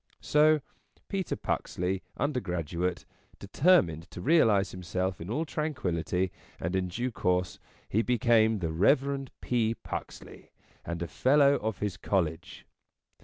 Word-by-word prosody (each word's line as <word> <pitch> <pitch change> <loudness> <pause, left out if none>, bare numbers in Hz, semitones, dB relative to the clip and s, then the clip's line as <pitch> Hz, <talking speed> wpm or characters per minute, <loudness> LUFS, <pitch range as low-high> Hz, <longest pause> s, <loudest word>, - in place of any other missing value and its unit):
So 150 0 +4 0.5
Peter 195 -3 -2
Puxley, 90 +1 -2 0.2
undergraduate, 90 - -2 0.3
determined 100 - +2
to - - -9
realize 110 - +3
himself 90 0 -3
in 85 - -7
all 150 +9 -1
tranquillity, 95 - -2 0.3
and 85 +3 -2
in 95 -1 0
due 120 +8 -3
course 90 -3 -1 0.3
he 110 - +1
became 115 -2 +3
the 85 -4 -2
Rev. 135 - +2
P. 115 -2 0
Puxley, - - -8 0.3
and 85 +1 -4
a - - -4
fellow 140 - +4
of 110 -2 -3
his 105 -3 -2
College. 85 -5 -2
100 Hz, 120 wpm, -29 LUFS, 90-135 Hz, 0.5 s, So